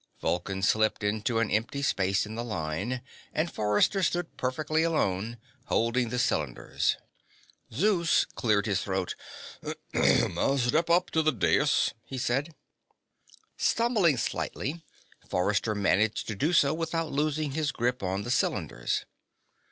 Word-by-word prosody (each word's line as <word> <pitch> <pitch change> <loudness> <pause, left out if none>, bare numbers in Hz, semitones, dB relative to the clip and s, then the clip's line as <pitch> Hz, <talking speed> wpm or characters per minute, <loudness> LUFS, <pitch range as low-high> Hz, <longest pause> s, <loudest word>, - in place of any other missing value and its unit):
Vulcan 95 +2 -2
slipped 110 +1 +2
into 110 +3 0
an 115 -2 +1
empty 115 +6 0
space 95 -6 +1
in 105 - -7
the 115 +1 -3
line, 105 +4 -3 0.3
and 160 +2 -1
Forrester 105 - +2
stood 175 -1 -1
perfectly 155 +5 0
alone, 115 - 0 0.3
holding 115 +1 +1
the 125 - -2
cylinders. 75 - 0 0.7
Zeus 170 - +3
cleared 105 -3 0
his 100 -3 0
throat. 95 -2 -2 0.8
"Step 140 +5 +2
up 175 +1 +2
on 160 - +4
the 155 - +4
dais," 120 - +2
he 130 +3 -7
said. 135 +6 -1 1.0
Stumbling 215 - +2
slightly, 155 +6 -3 0.5
Forrester 105 +4 +1
managed 105 +2 +1
to 110 - -2
do 145 - +1
so 145 -4 +4
without 165 0 -2
losing 150 0 0
his 150 +1 -1
grip 125 -1 -1
on 95 +1 -2
the 120 - -3
cylinders. - - -1
120 Hz, 130 wpm, -28 LUFS, 105-155 Hz, 1.0 s, on